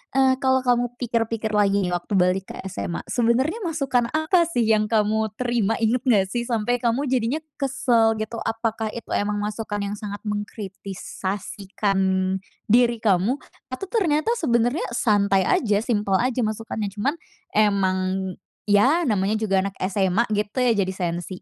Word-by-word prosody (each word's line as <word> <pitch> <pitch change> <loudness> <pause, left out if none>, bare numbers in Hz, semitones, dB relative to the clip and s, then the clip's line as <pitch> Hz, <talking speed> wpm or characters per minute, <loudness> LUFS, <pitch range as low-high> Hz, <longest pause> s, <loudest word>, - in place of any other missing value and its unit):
eee, 265 -1 +5
kalau 260 -1 +2
kamu 245 -1 +1
pikir-pikir 230 -2 -1
lagi 200 -1 +2
waktu 175 +3 -3
balik 185 +1 +2
ke - - -7
SMA, 180 -2 -4
sebenarnya 255 - +1
masukan 275 -8 0
apa 330 +2 +3
sih 245 -9 0
yang 215 -1 +3
kamu 220 0 +1
terima, 235 -3 0
ingat 235 +3 +2
enggak 200 -5 +4
sih 240 0 -1
sampai 240 +1 0
kamu 240 +4 0
jadinya 255 +4 +1 0.2
kesal 235 -5 +2
gitu? 220 +1 -4
Apakah 225 -1 -2
itu 235 - -8
memang 205 0 0
masukan 210 0 -3
yang 200 +1 -3
sangat 205 0 -6
mengkritisasikan 200 -1 -4 0.7
diri 240 0 +4
kamu, 200 +5 +3 0.3
atau 255 +10 -5
ternyata 355 -2 +1
sebenarnya 245 0 +1
santai 200 -4 +3
aja, 210 -3 +2
simpel 205 -5 +1
aja 250 +3 0
masukannya, 215 -1 -3
cuma 215 +7 0 0.4
emang 190 -2 +1 0.4
ya 260 +12 +4
namanya 210 - +1
juga 210 -3 +1
anak 200 - -4 0.2
SMA 195 +2 +2
gitu 210 +3 -2
ya 250 -2 +4
jadi 190 -1 0
sensi? 175 0 -4
220 Hz, 145 wpm, -23 LUFS, 200-245 Hz, 0.7 s, eee